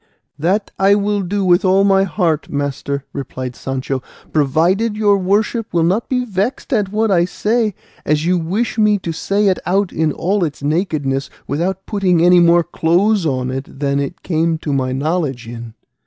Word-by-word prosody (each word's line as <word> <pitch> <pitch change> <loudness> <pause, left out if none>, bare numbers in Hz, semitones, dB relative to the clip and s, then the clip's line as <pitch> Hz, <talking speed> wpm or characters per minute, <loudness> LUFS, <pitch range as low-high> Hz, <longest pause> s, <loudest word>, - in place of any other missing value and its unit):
"That 190 +7 0
I 195 +1 +5
will 205 0 0
do 195 +2 -1
with 180 +1 +4
all 190 +1 +4
my 195 -1 +4
heart, 170 -5 -1
master," 140 0 -3
replied 130 -2 -5
Sancho, 135 0 -3 0.3
"provided 170 +10 +1
your 205 -2 +4
worship 210 +4 0
will 170 -1 +2
not 190 +7 0
be 250 -1 0
vexed 215 +6 -2
at 205 -5 0
what 215 0 +1
I 175 -3 +4
say, 215 +2 0 0.3
as 150 +1 0
you 180 +1 +2
wish 205 +8 -2
me 210 -1 +4
to 175 -3 -5
say 200 +5 0
it 190 - +2
out 195 +1 0
in 160 -1 +1
all 190 +6 0
its 150 -3 -4
nakedness, 145 -4 -1 0.2
without 180 +6 -2
putting 190 -5 +1
any 180 0 +6
more 170 0 +5
clothes 175 +3 +1
on 130 -2 -1
it 135 +1 -7
than 140 -1 0
it 155 +7 -5
came 165 -1 0
to 150 -2 -3
my 130 -2 0
knowledge 135 -3 -2
in." 115 -1 -8
175 Hz, 180 wpm, -18 LUFS, 145-200 Hz, 0.3 s, any